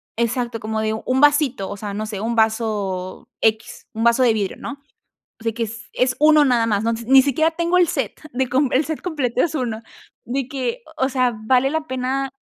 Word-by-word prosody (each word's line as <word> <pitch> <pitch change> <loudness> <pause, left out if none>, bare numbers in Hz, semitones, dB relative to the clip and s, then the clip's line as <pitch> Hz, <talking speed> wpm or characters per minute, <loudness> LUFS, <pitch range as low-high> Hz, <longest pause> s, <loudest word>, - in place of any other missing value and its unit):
Exacto, 235 0 -1
como 220 0 -3
de 220 0 0
1 255 +4 -1
vasito 290 -8 +3
o - - -5
sea, 205 0 -6
no 215 +1 -3
sé 210 -2 -5
1 230 +2 -2
vaso 210 -5 -1
X, 220 0 -1
un 225 - -3
vaso 235 +2 +4
de 235 -3 +4
vidrio, 205 -3 -2
¿no? 280 0 -7 0.6
O - - -13
sea, 225 - 0
que 230 +1 -4
es 230 +2 -9
es 255 0 +1
uno 305 0 +6
nada 245 -4 +2
más, 210 -2 +1
¿no? 230 - +1
Ni 270 +1 +7
siquiera 300 +4 +2
tengo 340 +2 +1
el 355 - +5
set - - -3
de 260 +1 -1
com 260 +2 +2
el 270 +4 +3
set 315 0 -4
completo, 270 -8 -1
es 330 - -3
uno 235 -6 -3 0.4
de 260 +1 -3
que, 280 - -3
o 265 - +1
sea, 255 -2 +1
¿vale 255 +3 +3
la 315 0 -2
pena? 260 0 -2
250 Hz, 215 wpm, -21 LUFS, 220-275 Hz, 0.6 s, Ni